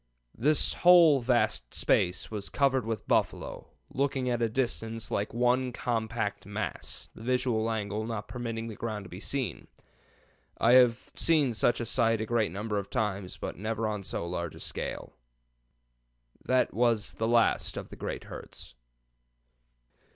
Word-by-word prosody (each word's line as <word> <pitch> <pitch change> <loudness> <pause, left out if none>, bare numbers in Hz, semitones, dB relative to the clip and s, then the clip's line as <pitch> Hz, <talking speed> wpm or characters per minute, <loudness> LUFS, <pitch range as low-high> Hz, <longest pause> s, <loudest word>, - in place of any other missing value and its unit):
This 150 +6 +2
whole 170 -5 +7
vast 120 - +1
space 90 +4 +1
was 105 -2 -4
covered 135 -4 +1
with 115 -3 -3
buffalo, - - 0 0.3
looking 135 -2 0
at 120 -1 -1
a 115 - +2
distance 115 -2 -2
like 100 - -1
one 125 +2 +2
compact 110 -4 -2
mass, 105 -4 -5
the - - -13
visual 125 -2 +1
angle 105 -1 -2
not 105 -3 -4
permitting 115 -2 -4
the 115 - -6
ground 105 -3 -4
to - - -11
be 90 - -8
seen. 135 +3 -3 0.9
I 115 - +4
have 125 -2 +5
seen 150 -7 +3
such 120 +2 +2
a 120 - -2
sight 115 -1 +2
a 110 - -1
great 110 -5 +1
number 105 +2 -2
of 100 - -7
times, 100 -3 -2
but - - -5
never 110 +3 -2
on 105 -2 -2
so 90 -3 -4
large 85 -2 -4
a - - -11
scale. - - -5 1.3
"That 130 0 +2
was 115 -2 +1
the 110 - -1
last 115 -1 +2
of - - -6
the - - -9
great - - -5
herds." - - -10
115 Hz, 155 wpm, -29 LUFS, 105-125 Hz, 1.3 s, whole